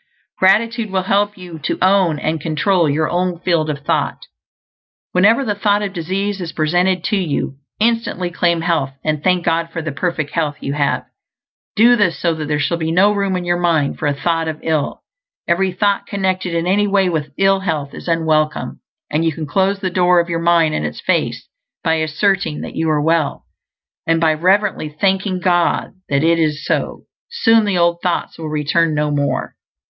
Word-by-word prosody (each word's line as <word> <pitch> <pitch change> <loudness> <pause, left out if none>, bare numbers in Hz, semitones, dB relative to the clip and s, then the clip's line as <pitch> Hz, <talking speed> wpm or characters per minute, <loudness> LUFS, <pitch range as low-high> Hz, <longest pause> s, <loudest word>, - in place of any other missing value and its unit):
Gratitude 220 +4 +2
will 190 -1 -1
help 205 +2 +1
you 175 -3 -9
to 140 - -2
own 185 -4 +3
and 155 +1 -2
control 165 +2 +1
your 155 +2 +1
own 180 0 -1
field 170 -4 +1
of 145 -1 -5
thought. - - -1 0.9
Whenever 220 +9 +3
the 210 - 0
thought 205 0 +1
of 195 -1 -4
disease 195 +3 -2
is 170 -2 -5
presented 175 +3 +1
to 210 - 0
you, 155 -7 -2 0.2
instantly 220 -6 0
claim 170 -1 +1
health, 165 -5 0
and 155 -1 -1
thank 180 -2 +1
God 165 0 0
for 165 -1 -4
the 155 - -3
perfect 155 -1 -2
health 150 -3 -1
you 140 - -4
have. 145 -1 0 0.7
Do 235 +3 +6
this 185 -10 +1
so 165 +2 +1
that 155 -2 -5
there 150 0 0
shall 145 +4 0
be 160 0 -1
no 200 +5 +4
room 200 -2 -1
in 180 -1 -3
your 175 0 0
mind 165 -5 +1
for 155 - -1
a 145 - 0
thought 165 +2 -1
of 155 -1 -4
ill. 155 -3 -1 0.4
Every 185 +2 +1
thought 200 +2 0
connected 190 -3 -1
in 165 0 0
any 205 +3 +2
way 195 -1 +2
with 155 -4 -2
ill 195 0 +3
health 155 -7 -3
is - - -10
unwelcome, 160 -2 0 0.3
and 155 +2 +1
you 165 - +2
can 155 0 -5
close 195 +6 0
the 185 -2 -2
door 180 0 +3
of 170 0 -1
your 165 -1 -1
mind 170 -2 +3
in - - -2
its - - -4
face - - -1 0.4
by 160 -3 +2
asserting 160 +1 0
that - - -7
you 160 0 0
are 155 -1 +2
well, 160 -1 0 0.6
and 165 0 +2
by 160 -1 +3
reverently 185 0 +1
thanking 190 +3 0
God 175 -1 +1 0.2
that 140 +1 +1
it 165 +1 +3
is 155 -1 0
so. - - -2 0.3
Soon 230 - +3
the 200 -3 0
old 170 0 +2
thoughts 175 -2 -2
will 160 -1 -5
return 155 +2 +1
no 150 0 0
more. 145 -1 -1
170 Hz, 195 wpm, -18 LUFS, 155-190 Hz, 0.9 s, Do